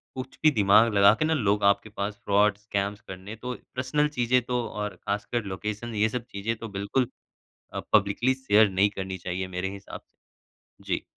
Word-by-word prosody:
कुछ 130 0 -7
भी 155 - +8
दिमाग 110 0 +5
लगा 100 +1 +7
के 155 - +2
ना 160 - +2
लोग 105 -7 +1
आपके 110 +2 0
पास 100 0 -4
फ़्रॉड्स, 105 0 +3
स्कैम्स 100 -1 -2
करने 95 +3 -8
तो 125 +3 -5 0.2
पर्सनल 140 +4 +1
चीज़ें 125 +1 +3
तो 125 0 -1
और 105 -2 -4
ख़ासकर 105 +5 -3
लोकेशन 105 +4 -5
ये 110 +1 +2
सब 125 -1 -4
चीज़ें, 100 +4 -2
तो 115 - -7
बिल्कुल 100 +6 -1 0.6
अ, - - -3
पब्लिकली 110 +5 +3
अ, - - -9
शेयर 105 0 +6
नहीं 95 +2 +3
करनी 95 -2 -5
चाहिए 90 +1 -4
मेरे 95 +1 -1
हिसाब 100 0 -9
से। - - -48 0.7
जी। - - -1
105 Hz, 190 wpm, -26 LUFS, 100-120 Hz, 0.7 s, भी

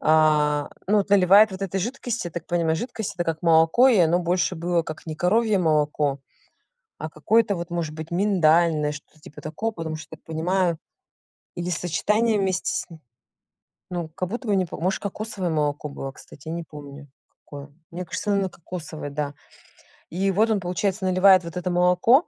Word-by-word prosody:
а, 150 -2 +3 0.2
ну 210 - +4
вот 200 - -1
наливает 200 +2 +6
вот 190 +1 -6
этой 195 0 -2
жидкости. 235 -1 -3
Я - - -15
так 170 -1 -6
понимаю, 165 -2 +1
жидкость, 220 -1 -4
это 175 - -1
как 165 0 -3
молоко, 165 +9 +5
и 230 -6 +4
оно 170 +1 +4
больше 180 +1 0
было 170 +1 0
как 155 0 -8
не 155 - -4
коровье 205 +5 +2
молоко, 150 -4 +1 0.8
а 155 - -5
какое-то 205 +7 +2
вот 170 0 -6
может 165 -3 -3
быть 160 0 -7
миндальное, 170 -5 +3
что-то 145 +2 -13
типа 150 - -13
такого. 195 +9 -3
Потому 165 -5 -5
что 155 0 -10
я - - -9
так - - -39
понимаю 170 +1 0 0.8
или 175 +1 -3
сочетание 210 +7 +1
вместе 190 -2 0
с - - -2
ни 160 - -12 0.9
ну, 175 -2 -3
как 180 +3 -4
будто 240 +2 -5
бы 205 - +2
не 185 -1 +2
по 165 - -8
может 185 +3 -1
кокосовое 200 -3 -4
молоко 150 -1 -1
было, 135 -1 -6
кстати, 140 +2 -15
я 160 - -3
не 170 0 -4
помню, 145 -2 -11 0.3
какое. 145 0 -10 0.2
Мне 180 +1 -5
кажется 205 +5 -3
оно 195 -1 +1
кокосовое, 160 -4 -8
да. 145 0 -3 0.7
И 195 +3 0
вот 220 +4 +2
он 210 -2 +2
получается 190 +2 -2
наливает 185 0 +5
вот 170 - -8
это 180 0 -2
молоко, 180 - +4
175 Hz, 185 wpm, -24 LUFS, 155-195 Hz, 0.9 s, наливает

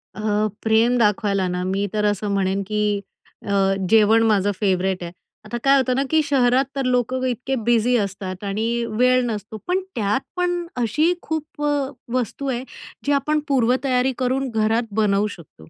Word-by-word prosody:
अ, - - -6 0.4
प्रेम 225 +2 +3
दाखवायला 205 -3 +1
ना, 180 0 -2
मी 195 +2 -1
तर 210 -1 0
असं 205 0 0
म्हणेन 195 0 0
की 210 -1 0 0.5
अ, - - -2 0.4
जेवण 220 +1 +5
माझं 205 -2 +2
फेवरेट 190 -2 0
आहे. 170 - -6 0.3
आता 240 +3 -4
काय 275 0 +5
होतं 255 -1 +1
ना 270 - +1
की 315 0 +3
शहरात 265 -2 +3
तर 270 -1 -1
लोकं 255 +1 0
इतके 255 +2 -2
बिझी 240 +1 +3
असतात 195 -2 -4
आणि 225 +4 -1 0.2
वेळ 255 0 +4
नसतो, 215 -2 -5
पण 365 +1 +1 0.2
त्यात 210 +3 0
पण 355 -1 -1 0.2
अशी 300 - +2
खूप 310 -2 -5
अ, 290 -2 0 0.2
वस्तू 255 +2 -2
आहे 250 -1 -2 0.4
जी 285 - +1
आपण 300 +2 +1
पूर्वतयारी 255 0 +2
करून 260 +1 0
घरात 225 +1 0
बनवू 210 -1 +2
शकतो. 110 - -16
230 Hz, 165 wpm, -22 LUFS, 205-260 Hz, 0.5 s, जेवण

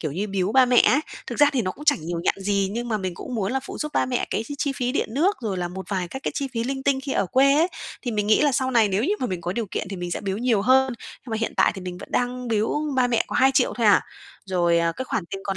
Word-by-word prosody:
kiểu 155 -4 -3
như, 200 +6 -2
biếu 195 +1 -1
ba 260 -1 +6
mẹ 245 0 +2
ấy. 280 - +3 0.3
Thực - - -6
ra 290 -1 +6
thì 250 -4 +1
nó 185 - -1
cũng 295 - -11
chẳng 290 - +3
nhiều 170 -1 -2
nhặn - - +2
gì, 200 0 0
nhưng 240 +2 -3
mà 220 - 0
mình 185 -2 -4
cũng 245 - -7
muốn 205 0 -1
là 265 - 0
phụ 275 - -8
giúp 300 -1 -4
ba - - +1
mẹ 250 -1 -1
cái 220 - -1
chi 285 - -6
chi 280 - 0
phí 250 -1 -2
điện - - -1
nước 375 +9 +2
rồi 205 -5 -3
là 175 -1 -2
một 190 +2 -8
vài 185 -3 -2
các 265 - -7
cái - - -2
chi 275 -2 -2
phí 230 0 -2
linh 265 +1 -3
tinh 270 -1 +1
khi 275 - -3
ở 195 - +1
quê 275 +6 +4
ấy. 330 +4 +3 0.3
Thì 245 - -2
mình 210 -2 -1
nghĩ 215 - +4
là 290 -2 +3
sau 260 +1 0
này 230 -4 +4
nếu 200 +5 0
như 405 +5 +1
mà 255 - 0
mình 185 -5 -4
có 175 +2 -3
điều 230 +1 -2
kiện - - -3
thì 195 - -4
mình 175 0 -5
sẽ - - -3
biếu 195 -1 -3
nhiều 230 -4 +1
hơn, 260 +2 +4
nhưng 245 - -12
mà 220 - -1
hiện 225 - -2
tại - - +4
thì 190 - -7
mình 180 -1 -6
vẫn - - -10
đang 250 0 -1
biếu 220 -1 0 0.2
ba 250 -1 +4
mẹ 235 -2 +1
có - - -3
2.000.000 265 0 +3
thôi 230 -3 +1
à. 205 - +6 0.5
Rồi, 175 -2 +2
ờ, 170 0 +1
cái 260 - -5
khoản 225 -7 -2
tiền 195 +1 -6
còn 195 -1 -2
230 Hz, 330 wpm, -24 LUFS, 190-265 Hz, 0.5 s, ba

